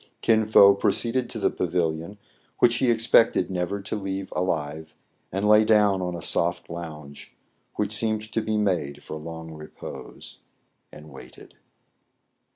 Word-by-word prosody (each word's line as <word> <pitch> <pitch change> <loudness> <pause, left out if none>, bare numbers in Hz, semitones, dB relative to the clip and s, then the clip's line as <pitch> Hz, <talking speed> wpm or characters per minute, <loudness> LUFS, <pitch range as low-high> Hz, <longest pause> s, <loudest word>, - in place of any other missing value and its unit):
Kin 110 -1 +3
Fo 100 -2 +7
proceeded 120 +5 0
to - - -6
the - - +1
pavilion, 85 +3 -2 0.4
which 120 0 +3
he 130 - +1
ex 115 -1 +2
pected 115 -5 +3
never 90 +2 -2
to 100 - -4
leave 95 -1 -5
alive, 80 -3 -3 0.4
and 95 +3 -1
lay 105 +1 +6
down 105 -3 +3
on 90 -1 -3
a 85 - -7
soft 85 -1 -1
lounge, 75 -4 -9 0.4
which 105 -1 -2
seemed 110 0 0
to 115 - -1
be 110 0 -2
made 90 -9 -1
for 80 - -7
long 80 +1 -8
repose, 75 0 -10 0.5
and 75 0 -13
waited. 65 -2 -14
95 Hz, 150 wpm, -25 LUFS, 80-105 Hz, 0.5 s, Fo